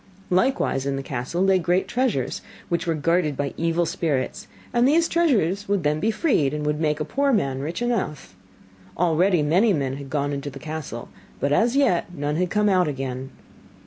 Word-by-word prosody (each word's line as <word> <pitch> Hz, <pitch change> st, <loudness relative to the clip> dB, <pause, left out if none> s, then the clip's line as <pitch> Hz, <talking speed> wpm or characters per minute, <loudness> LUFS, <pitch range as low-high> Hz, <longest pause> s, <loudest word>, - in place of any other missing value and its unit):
Likewise 180 Hz, -, +1 dB
in 140 Hz, -, 0 dB
the 135 Hz, -, -4 dB
castle 135 Hz, +8 st, -2 dB
lay 190 Hz, -1 st, +4 dB
great 180 Hz, +2 st, +1 dB
treasures, 240 Hz, -, -1 dB, 0.3 s
which 170 Hz, 0 st, -1 dB
were 165 Hz, -, +1 dB
guarded 155 Hz, -1 st, +1 dB
by 140 Hz, -1 st, -2 dB
evil 165 Hz, +1 st, +1 dB
spirits, 155 Hz, -5 st, -2 dB, 0.3 s
and 240 Hz, +1 st, +4 dB
these 325 Hz, +4 st, +4 dB
treasures 210 Hz, -, +1 dB
would 200 Hz, -4 st, 0 dB
then 150 Hz, +1 st, +1 dB
be 215 Hz, -, +1 dB
freed, 210 Hz, -, +1 dB
and 150 Hz, 0 st, -3 dB
would 150 Hz, 0 st, 0 dB
make 150 Hz, -1 st, +1 dB
a 150 Hz, -, -2 dB
poor 280 Hz, -, +1 dB
man 140 Hz, -, 0 dB
rich 165 Hz, -, -3 dB
enough. 150 Hz, -, -2 dB, 0.6 s
Already 175 Hz, 0 st, +3 dB
many 190 Hz, +9 st, +3 dB
men 135 Hz, -4 st, -1 dB
had 140 Hz, -1 st, -9 dB
gone 145 Hz, 0 st, -1 dB
into 140 Hz, +1 st, -4 dB
the -, -, -10 dB
castle, 150 Hz, -7 st, -6 dB, 0.3 s
but 140 Hz, +2 st, 0 dB
as 235 Hz, -, +3 dB
yet 185 Hz, -11 st, +2 dB
none 145 Hz, 0 st, -2 dB
had 180 Hz, 0 st, 0 dB
come 210 Hz, +1 st, +2 dB
out 185 Hz, -3 st, +3 dB
again. 135 Hz, -2 st, -4 dB
165 Hz, 190 wpm, -23 LUFS, 145-200 Hz, 0.6 s, lay